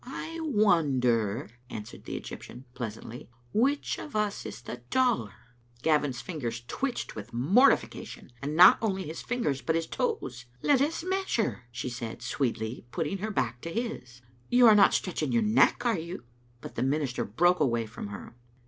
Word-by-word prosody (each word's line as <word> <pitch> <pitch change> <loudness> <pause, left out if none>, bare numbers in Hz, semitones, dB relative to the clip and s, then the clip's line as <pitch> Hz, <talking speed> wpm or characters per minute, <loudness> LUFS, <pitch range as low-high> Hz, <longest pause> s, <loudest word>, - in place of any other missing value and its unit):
"I 320 +6 -6
wonder," 140 - +2 0.2
answered 105 -2 -8
the - - -5
Egjrptian, 125 - -9
pleasantly, 115 0 -7 0.2
"which 270 +7 +1
of 295 - -8
us 210 -1 -1
is 120 - -9
the 120 - -6
taller." 235 - +1 0.5
Gavin's 145 -5 +2
fingers 120 -9 -4
twitched 265 - -3
with 105 -2 -8
mortification, 160 - +2
and 145 +2 -3
not 180 +3 +9
only 195 -4 0
his 160 -1 -6
fingers 190 - -1
but 160 - 0
his 165 0 0
toes. 130 - -3
" 125 - -32
Let 280 -3 +4
us 310 +3 0
measure," 370 - -1
she 120 - -4
said, 120 -1 -6
sweetly, 120 -2 -2
putting 170 +7 -2
her 215 +3 -3
back 120 - -1
to 165 - -5
his. 165 - -5
" 120 0 -32
You 245 0 +6
are 220 - +9
not 205 -1 +6
stretching 185 - -1
your 235 -1 +3
neck, 220 +3 +3
are 230 -7 +2
you?" 170 -2 -7 0.4
But - - -8
the - - -3
minister 135 -1 0
broke 175 - +2
away 120 -6 +1
from 110 -1 -7
her. 100 +2 -9
155 Hz, 170 wpm, -28 LUFS, -, 0.5 s, not